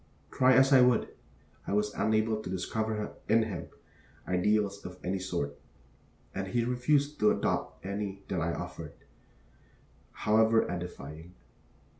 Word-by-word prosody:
Try 130 0 +4
as 135 +2 +6
I 130 - +8
would, 125 -2 +3 0.6
I - - -1
was 105 0 +1
unable 110 0 +1
to - - -7
discover 105 +3 -2 0.2
in 110 +1 +5
him 100 -6 -5 0.6
ideals 100 +2 +1
of 90 0 -8
any 95 +1 -1
sort, 85 -7 -3 0.8
and 95 - -3
he 115 +5 0
refused 140 +4 +1
to 105 - +5
adopt - - -1
any 100 0 -4
that 90 -4 -2
I 85 0 0
offered, - - -6 1.2
however 110 +1 +3
edifying. 85 -1 -7
105 Hz, 130 wpm, -30 LUFS, 90-110 Hz, 1.2 s, I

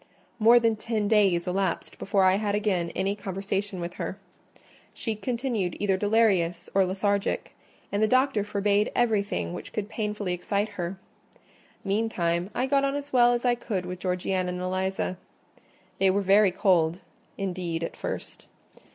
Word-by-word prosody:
More 230 +2 +7
than 230 -1 +2
ten 215 -1 -1
days 195 -5 +3
elapsed 185 -1 -2
before 195 -1 +1
I 185 +1 +5
had 205 -1 0
again 195 -5 0
any 195 +2 0
conversation 195 0 -3
with 170 0 -4
her. - - -4 0.8
She 225 - -2
continued 230 -4 -2
either 200 -2 +2
delirious 190 -5 +1
or 195 -1 +4
lethargic; 200 +2 -1 0.4
and 205 - 0
the 215 - +4
doctor 255 -3 +2
forbade 205 0 +1
everything 200 - 0
which - - -7
could 210 -1 -4
painfully 210 -4 -2
excite 200 +4 -1
her. 190 -2 -5 0.9
Meantime, 190 -4 0
I 255 - +1
got 275 +1 +2
on 275 0 0
as 285 -1 -6
well 245 -1 +6
as 240 +1 -1
I 245 - +4
could 215 -6 -3
with 180 0 -6
Georgiana 185 0 -1
and 180 0 -4
Eliza. 185 0 -2 0.8
They 195 - +4
were 200 +2 +2
very 200 +1 +5
cold, 180 -1 +2 0.3
indeed, 180 -4 -3
at - - -4
first. - - -6
200 Hz, 155 wpm, -27 LUFS, 185-215 Hz, 0.9 s, More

